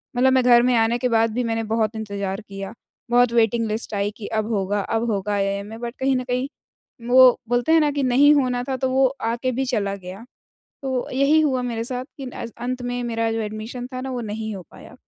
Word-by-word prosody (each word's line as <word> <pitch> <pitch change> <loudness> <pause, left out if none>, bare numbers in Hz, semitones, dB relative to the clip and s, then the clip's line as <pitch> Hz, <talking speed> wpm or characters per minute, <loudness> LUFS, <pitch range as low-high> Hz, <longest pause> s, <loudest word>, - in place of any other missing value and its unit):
मतलब 260 +1 +4
मैं 260 -1 +4
घर 240 -1 +6
में 250 -1 +3
आने 225 +1 +2
के 250 +1 0
बाद 225 -1 +2
भी 250 +1 -1
मैंने 225 -1 -1
बहुत 220 0 -1
इंतज़ार 200 -1 -4
किया, 195 +1 -8 0.4
बहुत 245 -1 +4
वेटिंग 230 0 +2
लिस्ट 215 0 -4
आई 200 +1 0
कि 210 - -7
अब 215 -1 -1
होगा, 200 +1 0
अब 225 +4 -1
होगा 205 +1 -1
आईआईएम 200 0 -1
में 225 +1 -9
बट 240 +1 -5
कहीं 265 0 +2
न 255 - -1
कहीं 250 +2 -1 0.6
वो 255 0 +7
बोलते 245 +5 +1
हैं 325 - +6
ना 295 -1 +2
कि 285 -1 -1
नहीं 275 +4 +5
होना 250 -3 +1
था, 265 0 -3
तो 260 0 -1
वो 265 +1 +3 0.2
आके 235 +3 -1
भी 265 +2 -1
चला 205 -6 -1
गया। 190 +4 -10 0.6
तो 260 -2 -2
यही 275 +4 +3
हुआ 260 -4 +1
मेरे 230 -2 -3
साथ 250 +1 -4
कि 270 - -6
नैज़ 235 -2 -7
अंत 250 +1 -3
में 245 0 -3
मेरा 230 -1 -1
जो 225 - -2
एडमिशन 220 +4 -6
था 255 - -4
ना 265 0 -5
वो 245 -1 -3
नहीं 220 0 -4
हो 185 - -7
पाया। - - -14
235 Hz, 235 wpm, -22 LUFS, 220-255 Hz, 0.6 s, वो